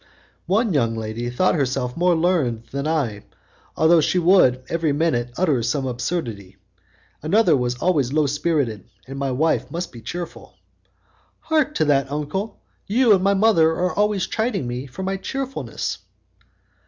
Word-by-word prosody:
"One 210 +2 +1
young 115 -6 +1
lady 110 +2 -4
thought 155 +10 +2
herself 130 -4 -1
more 175 0 +2
learned 160 -10 0
than 140 +2 -3
I, 130 -11 -1 0.5
although 160 +1 +5
she 180 - +1
would, 165 -8 +4
every 165 -2 0
minute, 140 -5 0
utter 155 -9 +2
some 130 +4 -1
absurdity. 120 - -4 0.6
Another 175 +1 +3
was 125 -2 -1
always 145 -6 +1
low 155 +1 +2
spirited, 140 - -1 0.2
and 135 +1 -7
my 140 -1 -1
wife 130 -2 0
must 170 +4 -5
be 120 - -11
cheerful." 175 +9 -7 0.9
"Hark 310 -2 0
to 155 - +2
that, 140 -2 +1
uncle! 150 +9 -4 0.2
You 230 +2 +4
and 190 -2 +2
my 200 +1 +3
mother 195 -6 +4
are 180 +2 -1
always 205 -2 +1
chiding 220 - -2
me 125 +3 -5
for 155 +9 -7
my 195 +1 -2
cheerfulness." 270 +6 -4
155 Hz, 155 wpm, -22 LUFS, 125-185 Hz, 0.9 s, although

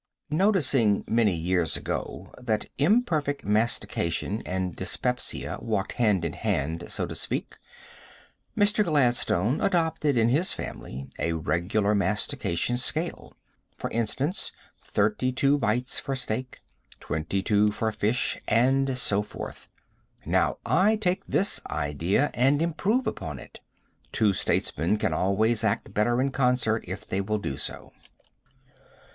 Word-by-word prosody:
Noticing 145 - +3
many 110 -5 +3
years 85 0 0
ago - - -5
that 110 -4 -1
imperfect 155 - +2
mastication 105 -2 0
and 90 -2 -2
dyspepsia 125 0 -2
walked 105 -4 -1
hand 105 -8 +2
in 80 - -2
hand, 80 +3 -2
so - - -2
to - - -6
speak, - - -4 1.0
Mr. 205 +1 +4
Gladstone 125 - +2
adopted 160 -6 +1
in 115 0 +4
his 155 +9 +2
family 65 +2 -7
a 85 - 0
regular 85 +7 0
mastication 105 +1 0
scale; 160 +6 -2 0.4
for - - -4
instance, 130 - -1 0.3
thirty 130 -12 0
two 140 +3 +2
bites 120 +2 0
for 135 - -3
steak, 125 0 -4 0.4
twenty 80 +6 -2
two 105 0 +3
for 110 +1 -1
fish, 110 +4 0
and 130 +3 +3
so 105 -5 +3
forth. 105 - -8 0.6
Now - - +2
I 210 +4 +4
take 195 -2 0
this 200 +2 +2
idea 80 - 0
and 135 +4 +3
improve 195 +10 +1
upon 80 - -4
it. - - -12 0.5
Two 105 -3 +3
statesmen 85 +1 0
can - - 0
always 110 +4 +1
act 105 -1 -1
better 120 +4 +2
in 135 +1 +1
concert 125 -4 +1
if 95 +4 -6
they 95 -1 -1
will 105 +2 -1
do 70 -10 -3
so. - - -3
115 Hz, 130 wpm, -27 LUFS, 100-140 Hz, 1.0 s, Mr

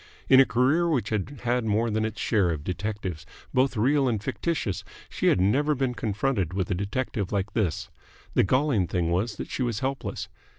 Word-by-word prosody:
In 130 - +7
a 135 - +7
career 140 +8 +2
which 125 -11 0
had 110 +6 -3
had 120 0 +1
more 110 +1 +1
than 110 +1 0
its 110 - -5
share 100 -5 +2
of 80 -4 -3
detectives, 95 -2 -4 0.3
both 130 -1 +2
real 135 +5 +3
and 115 -4 +1
fictitious, 115 - -2 0.3
she - - -1
had - - +4
never 140 +11 +2
been 130 -2 0
confronted 105 - -1
with 95 0 -1
a - - +3
detective 100 +2 -2
like 100 0 -1
this. 95 -8 -1 0.4
The - - +4
galling 130 - +2
thing 85 -2 0
was 100 +6 0
that - - -7
she - - -3
was 120 -4 -1
helpless. 135 0 -3
110 Hz, 195 wpm, -26 LUFS, 95-130 Hz, 0.4 s, In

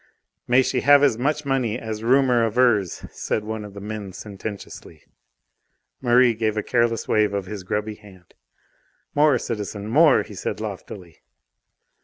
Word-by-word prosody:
"May 125 +2 +4
she 125 -1 -1
have 145 +1 +6
as 125 -5 +3
much 150 +3 -1
money 130 -5 0
as 110 -2 -6
rumour 125 0 +3
avers," 110 -6 +1
said 105 - -3
one 110 0 -5
of 100 -1 -11
the - - -7
men 105 -2 -6
sententiously. 100 -6 -9 1.0
Merri 125 -1 +4
gave 110 -1 -1
a 105 - -1
careless 115 -2 0
wave 105 -2 +2
of 100 -2 -2
his 100 +1 -7
grubby 105 +3 -3
hand. 100 -4 -18 0.8
"More, 145 -2 +4
citizen; 105 -3 -5
more!" 145 +4 +5
he - - -12
said - - -4
loftily. 85 -6 -8
110 Hz, 150 wpm, -23 LUFS, 105-125 Hz, 1.0 s, have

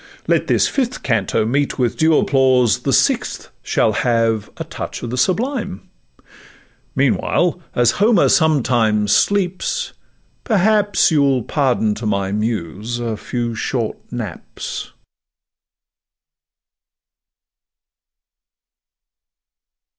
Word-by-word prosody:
Let - - +1
this - - +3
fifth 255 -3 -2
canto 115 -3 0
meet 140 +5 0
with 125 -3 0
due 160 -1 +3
applause, 130 -4 +3
The - - -2
sixth - - 0
shall 110 - +1
have 115 -2 0
a - - -4
touch - - -7
of 120 - -4
the - - -2
sublime; 205 - -2 1.0
Meanwhile, - - +1
as 120 -1 +4
Homer 215 -3 +4
sometimes 120 - +2
sleeps, 200 - 0 0.5
perhaps 210 -2 +2
You'll 140 -5 +2
pardon 125 -7 0
to 110 +1 -5
my 100 -2 -1
muse 105 +1 -3
a 115 -2 -3
few 120 +2 -4
short 115 0 -3
naps. 110 -8 -6
125 Hz, 95 wpm, -19 LUFS, 110-160 Hz, 1.0 s, as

